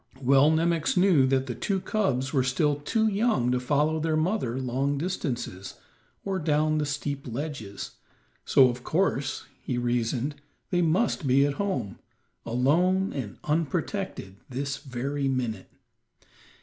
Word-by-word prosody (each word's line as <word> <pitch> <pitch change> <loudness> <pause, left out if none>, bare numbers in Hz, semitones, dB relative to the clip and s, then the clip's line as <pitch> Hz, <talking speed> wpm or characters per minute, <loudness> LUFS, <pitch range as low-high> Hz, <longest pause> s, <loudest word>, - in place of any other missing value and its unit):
Well 135 +2 +5
Nemox 165 +1 +1
knew 180 -8 +5
that 130 0 +1
the 125 - -4
two 195 - -1
cubs 135 - -1
were 135 - +3
still 145 +3 +1
too 220 +10 0
young 205 - +1
to 125 - +1
follow 150 +4 +1
their 155 0 0
mother 155 - 0
long 135 +3 -1
distances, 135 - -4 0.5
or 195 -1 -1
down 155 -1 +1
the 150 - -1
steep 140 -1 -3
ledges, 120 -6 -5 0.5
so 130 - +6
of 125 0 -4
course, 155 -6 0 0.2
he 125 - -3
reasoned, 120 +4 -1 0.3
they 175 -1 +2
must 175 - +1
be 135 +2 +5
at 145 - 0
home, 130 - -2 0.5
alone 175 +11 +2
and 115 -8 -5
unprotected, 160 - -2
this 135 +2 -3
very 135 +1 -3
minute. 120 -7 -2
140 Hz, 135 wpm, -27 LUFS, 125-165 Hz, 0.5 s, so